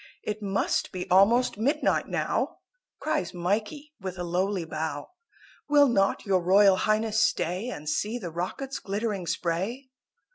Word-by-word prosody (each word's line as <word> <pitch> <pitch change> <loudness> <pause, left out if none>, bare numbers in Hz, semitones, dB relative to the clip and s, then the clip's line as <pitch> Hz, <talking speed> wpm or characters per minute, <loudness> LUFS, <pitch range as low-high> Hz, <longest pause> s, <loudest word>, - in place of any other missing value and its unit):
"It 210 0 -4
must 195 -1 0
be 180 -1 -5
almost 210 +5 +4
midnight 275 +7 +1
now," - - -1 0.4
Cries 245 - -2
Mikey 215 - -2
with 185 -1 -5
a 175 - -3
lowly 180 +1 -1
bow; 155 -2 -4 0.6
"Will 290 -1 +6
not 195 -6 +1
your 190 -3 +2
Royal 195 +2 +5
Highness 215 +1 +1
stay 190 +1 0
And 150 -10 -7
see 210 +9 -1
the 180 -8 -6
rockets 190 +11 -4
glittering 200 -2 -3
spray?" 200 +13 -2
195 Hz, 140 wpm, -27 LUFS, 180-225 Hz, 0.6 s, Will